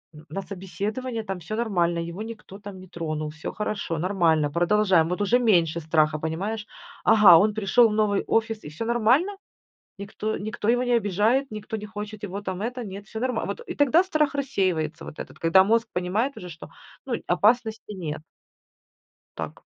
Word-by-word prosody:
н 155 +1 -13
на 195 - -4
собеседование, 210 +6 -4
там 195 -3 -5
всё 175 +6 -5
нормально, 175 -7 0
его 175 +5 -7
никто 220 -3 -10
там 200 -2 -9
не 185 - -12
тронул, 155 -3 -4
всё 155 +1 -6
хорошо, 210 -5 -3
нормально, 165 -4 +2
продолжаем". 175 0 +3
Вот 180 +3 -2
уже 225 +5 +3
меньше 170 -9 +3
страха, 155 -1 +2
понимаешь. 195 +8 -3 0.4
"Ага, 210 -6 +8
он 210 +5 +3
пришел 220 +3 +4
в - - -2
новый 210 -2 +1
офис 225 -1 0
и - - -8
всё 165 +10 -5
нормально. 240 - +2 0.6
Никто, 210 +2 -3
никто 210 +1 -4
его 245 +2 +3
не 245 - 0
обижает, 225 +6 +1
никто 215 +1 -5
не 210 0 -7
хочет 210 0 -7
его 200 0 -5
там 190 -1 -4
это, 245 +2 -3
нет, 200 0 -8
всё 220 - -7
нормально", 250 -2 -1
вот. - - -4
И - - -4
тогда 290 +4 +4
страх 310 -6 +1
рассеивается 190 - -1
вот - - -10
этот, - - -8
когда 165 +3 +5
мозг 230 +3 +2
понимает 205 +10 -1
уже, 180 - -8
что, 165 0 -10 0.4
ну 255 - -1
опасности 220 +3 +1
нет. 160 -5 -5 1.2
Так. - - -6
205 Hz, 180 wpm, -25 LUFS, 175-225 Hz, 1.2 s, Ага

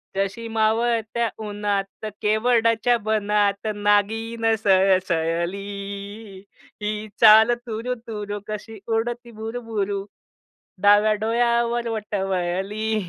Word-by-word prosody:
जशी 195 +4 -2
मावळत्या 225 +1 +1 0.2
उन्हात 205 -1 -3 0.2
केवडाच्या 230 +2 +2
बनात 210 -1 +1
नागिन 225 +2 +1
सळसळली. 195 +2 0 0.4
ही 210 +1 -3
चाल 220 +1 +8 0.2
तूरु 230 +3 -3
तूरू, 205 -2 -5
कशी 215 +1 -7
उडती 235 +1 -2
भुरुभुरु, 220 -3 -3 0.8
डाव्या 205 +1 +5
डोळ्यावर 235 +1 +1
बट 215 -1 -4
वळली. 195 +3 -1
215 Hz, 85 wpm, -23 LUFS, 200-225 Hz, 0.8 s, चाल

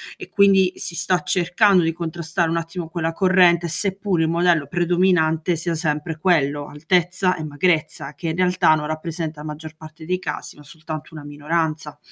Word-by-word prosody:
E - - -11
quindi 195 -2 +4
si 170 -2 -5
sta 180 +1 +1
cercando 185 +1 +3
di 165 - +1
contrastare 170 +1 -2
un 165 - -1
attimo 165 0 -5
quella 165 -1 -2
corrente, 180 -1 +3
seppur 190 +1 0
il 160 - +1
modello 175 +2 +3 0.2
predominante 175 -1 +1
sia 170 +1 -2
sempre 155 0 -2
quello, 145 -5 +1
altezza 180 +4 0
e 160 - -6
magrezza, 155 -1 -1
che, 165 - -4
in 160 - -2
realtà, 180 -2 +3
non 150 -1 -3
rappresenta 155 0 -4
la 155 - -7
maggior 155 +1 -8
parte 155 0 -12
dei 180 +2 -1
casi 150 -5 -6
ma 150 - -14
soltanto 155 +1 -8
una 150 - -8
minoranza. 150 +1 -3
165 Hz, 175 wpm, -21 LUFS, 155-180 Hz, 0.2 s, quindi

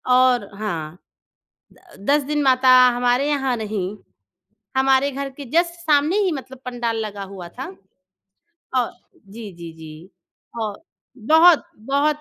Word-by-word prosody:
और 250 -5 +3
हाँ। 170 -6 -4 1.0
द 195 - -15
10 295 0 +4
दिन 295 +1 -1
माता, 260 -1 +3 0.3
हमारे 245 +3 +1
यहाँ 270 -4 0
नहीं, 210 -2 -4 0.8
हमारे 270 +1 +3
घर 275 +1 -4
के 275 +1 -10
जस्ट 340 +1 +1
सामने 310 +3 +2
ही 370 - +1
मतलब 265 -3 -7
पंडाल 240 -2 -2
लगा 205 -1 -6
हुआ 190 -2 -9
था। - - -7 1.1
औ 245 -2 +2 0.4
जी, 210 0 -9
जी, 170 -1 -9
जी। 160 +3 -12 0.5
औ 215 -2 -2 0.4
बहुत, 320 +8 +5
बहुत 280 +6 0
255 Hz, 135 wpm, -21 LUFS, 205-285 Hz, 1.1 s, बहुत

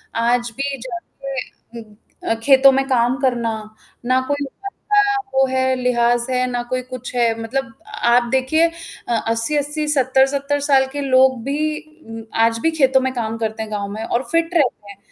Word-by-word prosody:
आज 240 +1 +1
भी 275 0 -2
जाके 245 0 -8
उ - - -11 0.4
अ, - - +1
खेतों 270 0 +7
में 270 0 +1
काम 245 -1 +2
करना, 240 -4 0 0.5
ना 255 +1 +3
कोई 285 0 -1
ढंग 395 +9 -9 0.2
का 410 0 +4 0.2
वो 270 0 +4
है 260 0 +1
लिहाज़ 240 -1 +1
है 255 0 +1
ना 245 0 -1
कोई 255 0 -1
कुछ 255 -1 -8
है 235 -2 +3
मतलब 255 +1 -3 0.4
आप 240 +1 +5
देखिए 265 +6 +3 0.4
अ, 240 - 0
80-80 290 +6 -1
70-70 275 +1 +2
साल 275 -2 +3
के 290 - -3
लोग 260 -2 +3
भी 305 +3 -1 0.3
उम, 225 0 -8
आज 230 0 +2
भी 325 - +3
खेतों 265 -4 +3
में 260 0 -1
काम 225 -2 -3
करते 220 -1 -3
हैं 215 - -9
गाँव 205 -1 -3
में 220 +2 -5
और 235 +2 -1
फिट 330 +1 +1
रहते 245 -9 0
हैं। 195 - -14
260 Hz, 180 wpm, -20 LUFS, 235-275 Hz, 0.5 s, खेतों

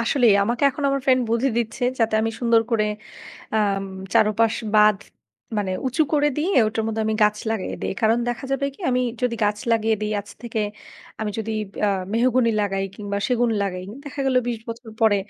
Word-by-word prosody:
আসলেই 230 -2 +4
আমাকে 235 +4 -2
এখন 275 +2 -7
আমার 275 0 0
friend 255 -1 +5
বুদ্ধি 235 +4 +2
দিচ্ছে 235 +1 -3 0.2
যাতে 225 -2 +2
আমি 225 - 0
সুন্দর 230 -2 +4
করে 220 -2 +2 0.7
আম 200 -2 +1 0.3
চারপাশ 220 +1 +3 0.2
বাঁধ 210 -1 +6 0.6
মানে 195 -2 -1
উঁচু 260 +5 +2
করে 295 -1 +3
দিয়ে 325 +6 0
ওটার 215 +1 -1
মধ্যে 220 0 -1
আমি 220 - +1
গাছ 210 0 +4
লাগিয়ে 220 -4 -2
দেই। - - -1
কারণ 225 +1 +3
দেখা 240 +3 -3
যাবে 270 +1 0
কি - - -22
আমি 250 0 +2 0.2
যদি 250 -2 +1
গাছ 210 0 0
লাগিয়ে 225 0 +2
দেই 210 0 -2
আজ 205 - -16
থেকে 230 -2 -3 0.6
আমি 215 -1 -1
যদি 220 0 -3 0.3
আ - - +3 0.2
মেহগনি 240 +1 +3
লাগাই 195 -1 -1
কিংবা 200 -1 -4
সেগুন 245 -2 +2
লাগাই 185 -2 -3 0.2
দেখা 285 -1 -6
গেল 260 -1 +2
২০ 235 -2 -2
বছর 230 0 -7
পরে 220 -2 +5
225 Hz, 190 wpm, -23 LUFS, 210-245 Hz, 0.7 s, বাঁধ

